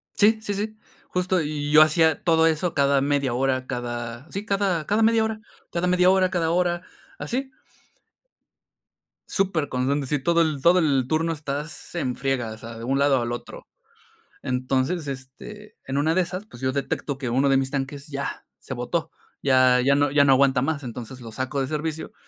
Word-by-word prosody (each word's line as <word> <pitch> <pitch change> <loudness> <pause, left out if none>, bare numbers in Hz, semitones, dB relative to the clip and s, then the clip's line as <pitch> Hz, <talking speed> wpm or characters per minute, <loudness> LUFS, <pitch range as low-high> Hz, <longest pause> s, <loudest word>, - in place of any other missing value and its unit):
Sí, 215 +2 +4
sí, 205 -2 -3
sí. 215 +2 -4 0.3
Justo, 180 0 0
y 145 -1 -3
yo 155 0 +8
hacía 160 0 +4
todo 165 -1 +4
eso 165 +2 0
cada 140 -1 +3
media 140 -2 0
hora, 130 0 0
cada, 120 +2 -5
sí, 200 +2 -5
cada 195 -6 0
cada 210 +2 +1
media 225 0 +4
hora 220 -1 -3 0.3
cada 175 +1 -1
media 180 0 +4
hora, 190 -1 +3
cada 170 -3 0
hora, 175 0 +1 0.3
así. 265 +2 -3 1.8
Superconstante, 145 -7 0
sí, 150 +2 0
todo 170 +5 +2
el 155 -4 0
todo 175 +5 +5
el 140 -6 +2
turno 160 +3 0
estás 150 +2 -5
en 130 -7 -1
friegas, 125 -4 -2
o - - -15
sea, 115 +1 -9
de 115 - -8
un 135 +3 0
lado 140 -2 +3
al 120 0 -3
otro. 120 - -7 0.8
Entonces, 130 +5 -1
este, 140 +11 -9
en 135 - -3
una 155 +3 +2
de 185 - +3
esas, 185 +3 -3
pues, 125 - -14
yo 130 0 0
detecto 140 0 -3
que 130 -3 -3
uno 135 +4 +2
de 135 - +4
mis 135 0 0
tanques 140 +1 -4
ya 140 -2 -5
se - - -7
botó. - - -2 0.3
Ya 130 -2 +5
ya 140 +1 +4
no 145 0 +2
ya 145 0 +4
no 135 - +5
aguanta 135 -1 +4
más, 145 0 -1
entonces, 125 +1 -7
lo 115 -2 -9
saco 130 +4 -3
de 135 - 0
servicio. 155 +2 -4
145 Hz, 190 wpm, -24 LUFS, 130-175 Hz, 1.8 s, yo